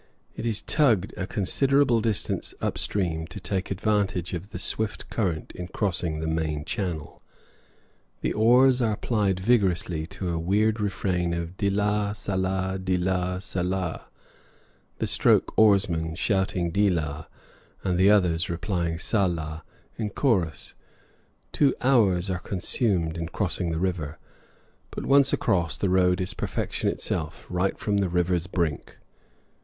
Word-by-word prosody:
It 120 Hz, -, -3 dB
is 110 Hz, -2 st, -1 dB
tugged 115 Hz, -, +2 dB
a 95 Hz, -, -4 dB
considerable 130 Hz, +5 st, +2 dB
distance 110 Hz, -3 st, -2 dB
up -, -, -2 dB
stream, 80 Hz, -5 st, -1 dB
to 90 Hz, +4 st, -8 dB
take 95 Hz, +1 st, -3 dB
advantage 100 Hz, -3 st, 0 dB
of 90 Hz, +3 st, -5 dB
the -, -, -6 dB
swift 105 Hz, +3 st, -3 dB
current 90 Hz, -8 st, -1 dB
in 90 Hz, 0 st, -7 dB
crossing 90 Hz, -5 st, -1 dB
the 80 Hz, -, -3 dB
main 80 Hz, -2 st, -1 dB
channel. 85 Hz, -5 st, -4 dB, 1.0 s
The -, -, 0 dB
oars 125 Hz, +4 st, +5 dB
are 110 Hz, -3 st, +1 dB
plied 100 Hz, -5 st, 0 dB
vigorously 95 Hz, -7 st, +1 dB
to 90 Hz, 0 st, -5 dB
a 85 Hz, -1 st, -1 dB
weird 105 Hz, +6 st, +1 dB
refrain 90 Hz, -4 st, -1 dB
of 85 Hz, +1 st, -5 dB
"deelah, 105 Hz, +1 st, 0 dB
sahlah 95 Hz, -1 st, -1 dB
deelah, 90 Hz, 0 st, 0 dB
sahlah!" 90 Hz, -2 st, -2 dB, 0.9 s
the -, -, -1 dB
stroke -, -, +3 dB
oarsman 95 Hz, -7 st, +3 dB
shouting 95 Hz, -2 st, 0 dB
"deelah" 80 Hz, -6 st, 0 dB, 0.6 s
and 90 Hz, -, 0 dB
the 95 Hz, +2 st, +6 dB
others 90 Hz, -5 st, +3 dB
replying 85 Hz, -1 st, -2 dB
"sahlah" 85 Hz, -5 st, -1 dB, 0.4 s
in 110 Hz, -2 st, -1 dB
chorus. 95 Hz, -, 0 dB, 0.8 s
Two 140 Hz, -3 st, +3 dB
hours 105 Hz, -9 st, +3 dB
are 90 Hz, -, -2 dB
consumed 90 Hz, -3 st, -1 dB
in 85 Hz, -1 st, -3 dB
crossing 90 Hz, -1 st, -2 dB
the 80 Hz, -, -2 dB
river, 85 Hz, -4 st, -2 dB, 0.7 s
but -, -, -6 dB
once 140 Hz, 0 st, +5 dB
across 85 Hz, -3 st, +1 dB
the 100 Hz, -, 0 dB
road 90 Hz, -1 st, +3 dB
is 90 Hz, 0 st, -1 dB
perfection -, -, -2 dB
itself, -, -, -4 dB
right 90 Hz, +2 st, 0 dB
from 105 Hz, -1 st, 0 dB
the 100 Hz, -2 st, +1 dB
river's 90 Hz, 0 st, 0 dB
brink. 85 Hz, -5 st, -2 dB
95 Hz, 135 wpm, -26 LUFS, 85-105 Hz, 1.0 s, the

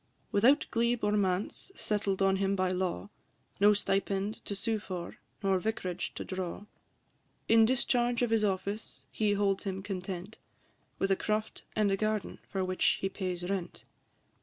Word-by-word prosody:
Without 250 Hz, +9 st, +5 dB
glebe 235 Hz, 0 st, +1 dB
or 205 Hz, -, +3 dB
manse 200 Hz, -, 0 dB
settled 200 Hz, -2 st, 0 dB
on 195 Hz, 0 st, +4 dB
him 195 Hz, 0 st, +1 dB
by 185 Hz, -1 st, +1 dB
law, 185 Hz, +2 st, -2 dB, 0.5 s
No 205 Hz, +1 st, +7 dB
stipend 200 Hz, +1 st, -1 dB
to 200 Hz, -, -3 dB
sue 220 Hz, +2 st, -1 dB
for, 180 Hz, -4 st, -6 dB, 0.3 s
nor 195 Hz, -1 st, +3 dB
vic'rage 185 Hz, -4 st, -3 dB
to -, -, -5 dB
draw; 185 Hz, +1 st, -4 dB, 0.8 s
In 225 Hz, 0 st, +7 dB
discharge 245 Hz, 0 st, +2 dB
of 240 Hz, -, +1 dB
his 225 Hz, -1 st, +3 dB
office 200 Hz, +1 st, -2 dB
he 210 Hz, -2 st, +1 dB
holds 200 Hz, -1 st, +1 dB
him 190 Hz, -1 st, -3 dB
content, 190 Hz, 0 st, -5 dB, 0.6 s
With 195 Hz, -, +1 dB
a -, -, +5 dB
croft 215 Hz, +2 st, -2 dB
and 210 Hz, -2 st, +3 dB
a 195 Hz, -, +2 dB
garden, 215 Hz, 0 st, -1 dB
for 190 Hz, -1 st, -1 dB
which 185 Hz, 0 st, +2 dB
he 195 Hz, -, -1 dB
pays 180 Hz, -2 st, -3 dB
rent. 190 Hz, -2 st, -3 dB
200 Hz, 160 wpm, -31 LUFS, 190-215 Hz, 0.8 s, No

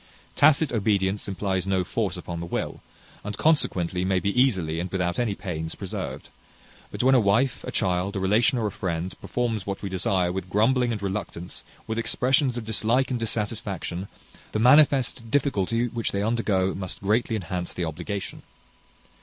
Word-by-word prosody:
Tacit 150 Hz, 0 st, +5 dB
obedience 100 Hz, -3 st, 0 dB
implies 95 Hz, -1 st, -1 dB
no 95 Hz, -1 st, +2 dB
force 100 Hz, -1 st, -2 dB
upon 85 Hz, -1 st, -6 dB
the 85 Hz, -, -5 dB
will, -, -, -3 dB, 0.4 s
and 105 Hz, 0 st, -5 dB
consequently 90 Hz, -, +1 dB
may 95 Hz, 0 st, +2 dB
be 100 Hz, +2 st, 0 dB
easily, 90 Hz, -11 st, +1 dB
and 90 Hz, +2 st, -3 dB
without 90 Hz, -2 st, -1 dB
any 115 Hz, -5 st, 0 dB
pains, 80 Hz, -5 st, -4 dB
preserved; 95 Hz, -2 st, -6 dB, 0.6 s
but -, -, -3 dB
when 130 Hz, +1 st, +5 dB
a 130 Hz, -, +6 dB
wife, 115 Hz, +5 st, +2 dB
a -, -, -4 dB
child, 90 Hz, +2 st, 0 dB
a -, -, 0 dB
relation, 110 Hz, +7 st, +3 dB
or 115 Hz, -, 0 dB
a 105 Hz, -, -1 dB
friend, 90 Hz, -1 st, -3 dB
performs 115 Hz, -5 st, -2 dB
what 100 Hz, +1 st, -4 dB
we 100 Hz, -, -2 dB
desire, 95 Hz, -1 st, +1 dB
with 95 Hz, 0 st, -4 dB
grumbling 120 Hz, +5 st, +3 dB
and 105 Hz, -3 st, -4 dB
reluctance, 95 Hz, -3 st, -4 dB, 0.2 s
with 110 Hz, +1 st, -2 dB
expressions 130 Hz, +2 st, +2 dB
of 115 Hz, -, -4 dB
dislike 115 Hz, +4 st, +2 dB
and 125 Hz, -, -1 dB
dissatisfaction, 105 Hz, -4 st, -3 dB, 0.5 s
the -, -, 0 dB
manifest 130 Hz, -1 st, +4 dB
difficulty 120 Hz, -3 st, +1 dB
which 115 Hz, -1 st, -2 dB
they 100 Hz, 0 st, -1 dB
undergo 105 Hz, -4 st, +1 dB
must 95 Hz, -2 st, -5 dB
greatly 110 Hz, +3 st, +1 dB
enhance 90 Hz, -3 st, -3 dB
the 90 Hz, -, -1 dB
obligation. 95 Hz, +5 st, -5 dB
100 Hz, 170 wpm, -25 LUFS, 95-115 Hz, 0.6 s, a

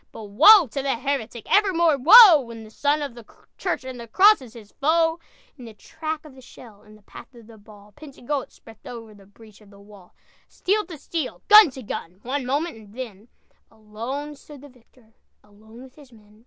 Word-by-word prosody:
But 220 Hz, -, -11 dB
woe 330 Hz, -, +6 dB
to 275 Hz, +2 st, -6 dB
the 270 Hz, -1 st, -2 dB
heretic, 245 Hz, -3 st, -5 dB
Evermore 340 Hz, -6 st, +2 dB
woe! 350 Hz, -, +8 dB
When 230 Hz, -2 st, -11 dB
the 215 Hz, -, -15 dB
son 290 Hz, +5 st, -1 dB
of 280 Hz, -4 st, -7 dB
the 235 Hz, -1 st, -14 dB, 0.4 s
church 360 Hz, -7 st, -3 dB
And 260 Hz, -1 st, -9 dB
the 235 Hz, -, -10 dB
cross 400 Hz, -, +4 dB
is 245 Hz, -2 st, -15 dB
his 215 Hz, -3 st, -15 dB
foe! 325 Hz, +2 st, +1 dB, 0.4 s
"In 245 Hz, -, -11 dB
the 225 Hz, -2 st, -13 dB
track 315 Hz, +7 st, -8 dB
of 300 Hz, -, -15 dB
the 260 Hz, -, -17 dB
shell, 230 Hz, -4 st, -17 dB
In 215 Hz, 0 st, -19 dB
the 215 Hz, -, -23 dB
path 245 Hz, -, -15 dB
of 235 Hz, -2 st, -16 dB
the 220 Hz, -1 st, -17 dB
ball, 205 Hz, 0 st, -18 dB
Pentagoet 280 Hz, -2 st, -7 dB
swept 225 Hz, -2 st, -18 dB
over 225 Hz, -3 st, -11 dB
The 200 Hz, -2 st, -20 dB
breach 215 Hz, +1 st, -20 dB
of 210 Hz, -, -20 dB
the 200 Hz, 0 st, -19 dB
wall! 200 Hz, -3 st, -19 dB, 0.3 s
Steel 415 Hz, +1 st, -3 dB
to 335 Hz, -4 st, -10 dB
steel, 300 Hz, -1 st, -6 dB
gun 425 Hz, -4 st, +8 dB
to 260 Hz, -1 st, -12 dB
gun, 180 Hz, -3 st, -8 dB
One 260 Hz, +1 st, -5 dB
moment, 285 Hz, 0 st, -3 dB
and 210 Hz, -1 st, -17 dB
then 225 Hz, -4 st, -10 dB, 0.4 s
Alone 230 Hz, +7 st, -8 dB
stood 290 Hz, -1 st, -16 dB
the 290 Hz, -, -15 dB
victor, 240 Hz, -2 st, -27 dB, 0.3 s
Alone 220 Hz, +4 st, -18 dB
with 260 Hz, -1 st, -16 dB
his 285 Hz, -4 st, -19 dB
men! 210 Hz, -2 st, -22 dB
250 Hz, 210 wpm, -22 LUFS, 215-295 Hz, 0.4 s, woe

